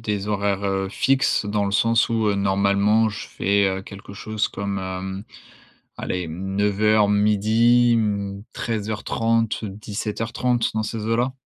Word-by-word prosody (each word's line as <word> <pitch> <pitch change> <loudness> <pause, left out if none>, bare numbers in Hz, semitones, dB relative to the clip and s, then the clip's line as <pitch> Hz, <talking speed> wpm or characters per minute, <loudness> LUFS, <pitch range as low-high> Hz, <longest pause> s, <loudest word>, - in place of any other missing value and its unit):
des 105 -2 -3
horaires, 100 -1 0
heu, 95 -1 -1
fixes 135 +1 +1
dans 105 0 0
le 100 - -3
sens 115 +3 +3
où, 110 -2 +1
heu, 100 - 0
normalement, 100 +3 +2
je 105 0 -7
fais, 100 0 +1
heu, 95 0 -3
quelque 100 0 -11
chose 110 +1 -2
comme, 100 0 -4
hem, 95 +1 -5 0.7
allez, 90 -3 -3
9:00-12:00, 105 +5 +3
mmh, 100 -2 -2
13:30-17:30, 110 +1 -2
dans 110 0 -1
ces 110 -1 -4
eaux-là. 120 +3 0
105 Hz, 125 wpm, -22 LUFS, 100-110 Hz, 0.7 s, sens